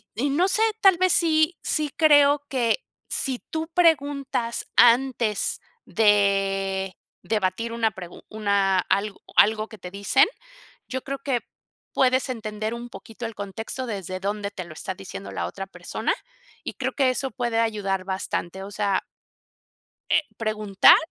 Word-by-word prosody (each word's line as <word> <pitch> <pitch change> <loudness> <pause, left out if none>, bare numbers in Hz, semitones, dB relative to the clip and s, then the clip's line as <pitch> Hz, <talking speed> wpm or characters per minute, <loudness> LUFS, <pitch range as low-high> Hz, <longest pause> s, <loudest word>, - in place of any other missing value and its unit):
y 265 +7 0
no 335 +7 +2
sé, 430 +3 +1 0.2
tal 385 -4 +6
vez 370 +1 +3
sí 315 0 +3
sí 305 -1 0
creo 290 -2 +5
que 255 - 0 0.3
si 260 -3 0
tú 320 0 -3
preguntas 280 -8 +1
antes 240 -3 +3 0.3
de 195 -2 +1 0.3
debatir 220 +2 -1
una 225 -1 +1
pregun 180 -3 -10
una 200 -3 +1
algo 200 +3 -1
algo 215 +1 +4
que 220 - -12
te 180 -2 -9
dicen, 200 +7 +3 0.6
yo 260 0 -4
creo 275 0 -4
que 265 -4 -1 0.5
puedes 260 +1 +2
entender 215 -2 -4
un 240 +1 -7
poquito 230 0 -10
el 225 -1 -5
contexto 220 +6 -5
desde 190 -4 -4
donde 200 +1 -3
te 190 -3 -7
lo 170 - -11
está 190 +4 -5
diciendo 195 +1 -8
la - - -3
otra 195 0 -6
persona, - - -3 0.5
y - - -5
creo - - -2
que 270 -2 +3
eso 265 +1 -2
puede 235 -1 -1
ayudar 200 -4 -1
bastante, 190 -1 -3
o 200 - -8
sea. 200 -2 0 1.1
Eh, - - +4 0.2
preguntar, 215 -3 +5
220 Hz, 150 wpm, -24 LUFS, 195-265 Hz, 1.1 s, tal